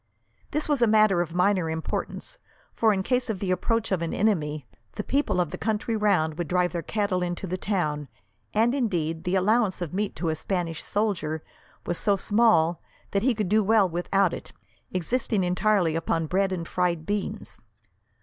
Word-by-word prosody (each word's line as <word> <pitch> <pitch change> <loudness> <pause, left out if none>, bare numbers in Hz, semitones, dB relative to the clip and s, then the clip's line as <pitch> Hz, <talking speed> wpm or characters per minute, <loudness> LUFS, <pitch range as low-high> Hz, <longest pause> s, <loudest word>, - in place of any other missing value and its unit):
This 300 - -1
was 290 -4 +1
a 235 - +5
matter 215 -4 +4
of 170 -1 -4
minor 180 -2 +2
importance, 160 0 -4 0.3
for 220 -1 +3
in 190 -2 0
case 250 +2 0
of 220 - -1
the 185 0 -2
approach 225 +5 0
of 185 -3 +1
an 170 - -2
enemy, 155 - 0 0.3
the 210 - -4
people 275 -7 0
of 175 -4 0
the - - -6
country 220 +1 -1
round 180 -7 +1
would 175 - -2
drive 180 +1 +1
their 170 - -2
cattle 200 -1 -1
into 175 +1 -3
the 185 0 -2
town, 155 -7 -1 0.4
and, 230 +3 +2
indeed, 170 - -1
the 180 +2 +1
allowance 205 +1 +2
of 175 -3 -4
meat 205 +1 -2
to 170 - -2
a 160 - 0
Spanish 170 -1 -3
soldier 170 -7 -1 0.4
was 175 - -1
so 205 -2 +2
small 195 -5 +3 0.3
that 200 - +1
he 250 +1 +2
could 210 -3 -1
do 215 +3 +3
well 210 -1 +4
without 180 +2 +1
it, - - -8 0.4
existing 205 +3 0
entirely 180 -2 +2
upon 165 0 0
bread 190 +4 +1
and 170 -3 -3
fried 175 -3 0
beans. 205 +1 -3
190 Hz, 185 wpm, -26 LUFS, 170-215 Hz, 0.4 s, a